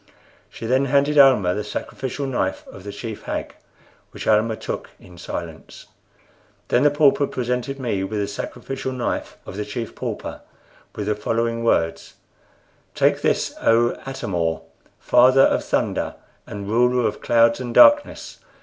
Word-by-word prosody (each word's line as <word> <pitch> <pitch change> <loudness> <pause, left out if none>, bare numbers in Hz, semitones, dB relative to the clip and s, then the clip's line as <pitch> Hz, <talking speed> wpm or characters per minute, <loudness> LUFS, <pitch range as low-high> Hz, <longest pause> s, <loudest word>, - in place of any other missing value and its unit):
She - - -9
then 130 +4 +2
handed 140 +2 +2
Almah 125 -10 +5
the 105 - -3
sacrificial 130 +6 -5
knife 120 -8 -2
of 95 - -12
the 100 - -6
Chief 105 +1 -7
Hag, - - -4 0.6
which - - -9
Almah 110 +1 +2
took - - -6
in 90 - -16
silence. - - -8 0.8
Then 120 - +3
the 145 - +5
pauper 145 -1 +3
presented 125 +2 -3
me 110 -7 -2
with 105 +2 -3
the 100 - -1
sacrificial 130 +6 -5
knife 125 -2 -3
of 95 - -8
the 105 - -2
Chief 110 +3 -6
Pauper, - - -6 0.5
with 105 - -4
the 105 - +1
following 115 +2 -2
words: 80 -8 0 0.8
"Take - - +2
this, - - 0
O 115 +1 +3
Atam 135 -7 -6
or, 80 -2 -1 0.4
Father 130 +2 +5
of - - +3
Thunder - - -1 0.3
and 100 -1 -7
Ruler 125 +2 +2
of - - -5
Clouds 115 0 +3
and 125 -2 -5
Darkness. 290 - +4
115 Hz, 150 wpm, -22 LUFS, 105-130 Hz, 0.8 s, Almah